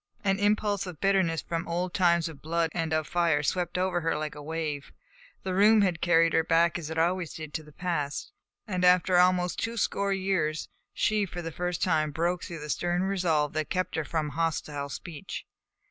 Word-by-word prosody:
An 195 0 +1
impulse 205 -1 +1
of 175 -4 -8
bitterness 190 -5 +2
from 165 -1 -2
the - - -10
old 175 +1 -2
times 170 -2 +3
of 155 -4 -10
blood 165 +1 0
and 165 -2 -2
of 155 -1 +1
fire 165 -4 +1
swept 180 +3 -1
over 180 -1 0
her 165 0 0
like 155 0 -3
a 150 - -9
wave. 155 -2 -4 0.5
The 185 - -2
room 210 +3 +6
had 180 -5 +1
carried 165 -1 +4
her 160 - +4
back 170 +2 +3
as 155 -2 -6
it 160 - -5
always 175 +1 0
did 155 -2 -7
to 160 - -2
the 150 0 -15
past, 160 -4 -3 0.3
and 185 -4 -2
after 180 0 +5
almost 180 -1 +3
two 230 +1 -3
score 200 -1 0
years 185 -5 0 0.2
she 210 -2 +1
for 175 0 -6
the 165 - -4
first 180 +2 -2
time 155 -4 +2
broke 170 +4 -1
through 165 -3 -7
the 150 - -7
stern 175 +1 0
resolve 170 -7 +1
that 155 - 0
had 155 - -3
kept 185 -1 -1
her 160 - 0
from 155 +1 -2
hostile 150 -2 -2
speech. 155 +1 -7
170 Hz, 210 wpm, -28 LUFS, 160-185 Hz, 0.5 s, room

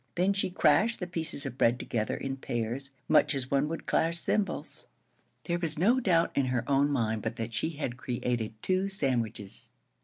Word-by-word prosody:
Then 185 +3 +3
she 195 -1 0
crashed 185 +6 +3
the 180 - -2
pieces 165 -5 -2
of 125 - -6
bread 120 +1 +4
together 110 -3 -2
in 135 0 -3
pairs, 120 +2 -3 0.2
much - - +4
as 130 -1 -3
one 140 +1 +2
would 165 +1 -5
clash 165 +1 +1
cymbals. 200 +4 -2 0.6
There 170 0 -1
was 160 -3 0
no 225 +10 +4
doubt 175 -8 +3
in 135 -2 +2
her 120 -2 -1
own 140 +1 +3
mind 110 -5 0
but - - -3
that 115 0 -4
she 160 - 0
had 125 -5 -3
created 120 -3 -2
two 190 +1 +1
sandwiches. 115 - -1
140 Hz, 185 wpm, -29 LUFS, 120-170 Hz, 0.6 s, bread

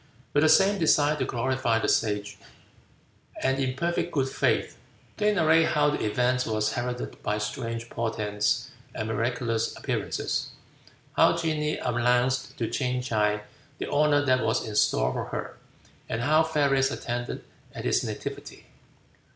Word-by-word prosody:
With 145 - +4
the 155 - +5
same 195 +5 +5
desire 150 -2 +3
to 130 - -1
glorify 125 -1 0
the 115 - -1
Sage, 105 -2 0 1.0
and 135 +1 +1
in 130 -1 -1
perfect 170 +3 -1
good 135 -3 0
faith, - - 0 0.4
they 210 0 +3
narrate 165 -4 +4
how 150 -1 +2
the 145 - -2
event 125 +3 +1
was 110 0 0
heralded 125 0 -4
by 105 0 -1
strange 115 +2 -4
portents 105 -3 -1 0.2
and 110 - -3
miraculous 115 0 -1
appearances, - - -2 0.7
how - - +5
genii 155 -2 -1
announced 125 +1 +1
to 115 - -1
Ching 125 0 -1
tsai 105 -3 +1 0.4
the - - -5
honor 145 0 +3
that 130 -2 +3
was 110 +2 0
in 105 - -5
store - - +2
for - - -3
her, - - -5 0.5
and 115 - -2
how 155 +5 +4
fairies 140 -4 +2
attended 120 -2 -4 0.3
at - - -6
his - - +2
nativity. - - -6
125 Hz, 145 wpm, -27 LUFS, 115-145 Hz, 1.0 s, the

